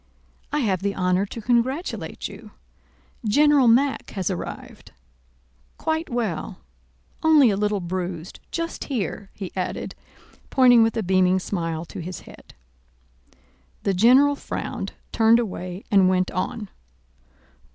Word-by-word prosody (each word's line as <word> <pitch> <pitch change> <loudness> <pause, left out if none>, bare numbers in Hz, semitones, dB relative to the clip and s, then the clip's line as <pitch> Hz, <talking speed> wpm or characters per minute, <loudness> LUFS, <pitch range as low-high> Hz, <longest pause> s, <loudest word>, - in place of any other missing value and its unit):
"I 300 - 0
have 195 -7 0
the 200 0 -1
honor 180 +2 +1
to 230 - -7
congratulate 250 - -1
you. - - -12 0.7
General 285 +4 +4
Mack 265 +4 +3
has 190 0 0
arrived, 180 - -7 0.8
quite 320 +1 -2
well, 220 -10 -3 0.6
only 300 -7 +6
a - - 0
little 205 0 0
bruised 175 -1 -5
just 335 0 -4
here," 205 - -3
he 190 -3 -6
added, 185 -1 -3 0.6
pointing 245 -3 +6
with 225 +1 +2
a 225 - 0
beaming 185 0 +3
smile 165 -3 -3
to - - -9
his 180 +2 -7
head. - - -15 1.3
The 195 - +1
general 255 +9 +5
frowned, - - -5 0.2
turned 225 0 +5
away, 185 -4 -4
and 195 -2 +5
went 185 0 +1
on. 210 +2 -3
205 Hz, 125 wpm, -23 LUFS, 185-250 Hz, 1.3 s, only